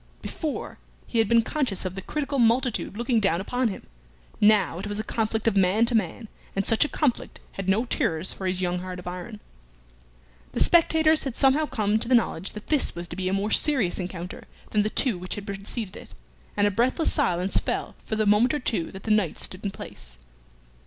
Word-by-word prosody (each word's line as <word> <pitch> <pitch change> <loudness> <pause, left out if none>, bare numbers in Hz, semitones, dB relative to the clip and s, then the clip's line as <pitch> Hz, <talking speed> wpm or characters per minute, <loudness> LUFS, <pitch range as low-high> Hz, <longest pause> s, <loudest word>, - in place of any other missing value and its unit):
Before, 310 -4 -4 0.3
he 230 - -1
had 220 -2 +3
been 230 -1 +5
conscious 235 -8 -1
of 185 - -2
the 190 - -6
critical 280 +3 -2
multitude 235 -2 +2
looking 235 0 +1
down 195 -5 +2
upon 245 +6 0
him; 200 - -6 0.5
now 205 -5 +4
it 200 - -5
was 205 0 -3
a - - -1
conflict 220 0 -1
of 220 - +3
man 195 +4 +4
to 240 - -2
man, 220 +1 -1 0.3
and 195 0 0
such 225 - +4
a 295 - -2
conflict 285 -6 -1
had 195 -1 -4
no 215 +6 +2
terrors 165 -7 -1
for 190 - -4
his 185 0 -1
young 180 0 0
heart 185 0 -6
of 180 - -10
iron. 180 +5 -6 1.1
The - - -2
spectators 320 -2 +4
had 265 -4 -4
somehow 285 +3 +4
come 215 -3 +1
to 230 - -4
the 255 - +5
knowledge 195 -6 0
that 210 - -8
this 300 - 0
was 175 0 -5
to - - -6
be 185 -1 -1
a - - -1
more 200 +2 0
serious 255 - +2
encounter 180 -1 -6 0.3
than 210 - +3
the 210 - 0
two 225 -5 0
which 185 +1 -3
had 205 - -7
preceded 200 +1 -5
it, - - -11 0.4
and 205 - +4
a 205 - +3
breathless 245 - +1
silence 180 +2 0
fell - - -3
for 220 - -3
the 215 0 +1
moment 215 +8 +4
or - - -1
two 220 - -2
that 190 - -9
the 220 - -1
knights 210 -6 +1
stood 185 +2 -6
in 200 - 0
place. - - -10
210 Hz, 215 wpm, -26 LUFS, 185-240 Hz, 1.1 s, been